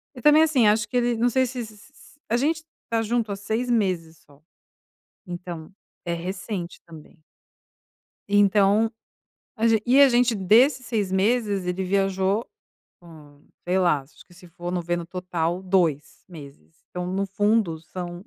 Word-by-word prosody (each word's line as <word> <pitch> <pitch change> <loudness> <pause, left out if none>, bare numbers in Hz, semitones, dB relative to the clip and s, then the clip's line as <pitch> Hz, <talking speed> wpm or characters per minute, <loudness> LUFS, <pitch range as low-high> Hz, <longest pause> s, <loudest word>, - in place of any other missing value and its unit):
e 245 - -10
também 300 +3 +6
assim, 270 -9 +3
acho 210 0 +2
que 250 - -1
ele 240 -1 +1
não 240 +2 +2
sei 260 +2 +2
se 250 -1 -5
se 215 -1 -14
se 240 - -19
s 285 - -20
A 230 - +2
gente 315 +5 0 0.2
está 230 -1 -1
junto 225 -1 -1
há - - -2
6 220 +5 -3
meses 180 -8 -1
só, 145 0 -22 0.9
então 175 -2 -7 0.3
é 170 - -2
recente 180 +1 -5
também. 160 0 -15 1.1
Então, 205 +2 +3 0.7
a 225 +1 +1
gen 225 -1 +3
e 260 +3 +5
a 280 - +8
gente 240 -1 +3
desses 235 +7 +3
6 215 -5 -1
meses, 200 -1 +1
ele 185 +1 -2
viajou, 195 +2 0 0.6
hum, 150 -4 -16 0.2
sei 185 +1 +1
lá, 175 -6 +2
acho 135 +2 -19
que 175 - -20
se 180 +1 -16
for 175 +1 -7
no 180 -1 -1
ver, 175 +1 -1
no 170 -1 -5
total, 180 -1 -3
2 175 -6 0
meses, 140 - -14
então, 180 0 -4
no 195 +2 -2
fundo 205 -3 +1
são 175 +2 -8
195 Hz, 170 wpm, -24 LUFS, 175-225 Hz, 1.1 s, a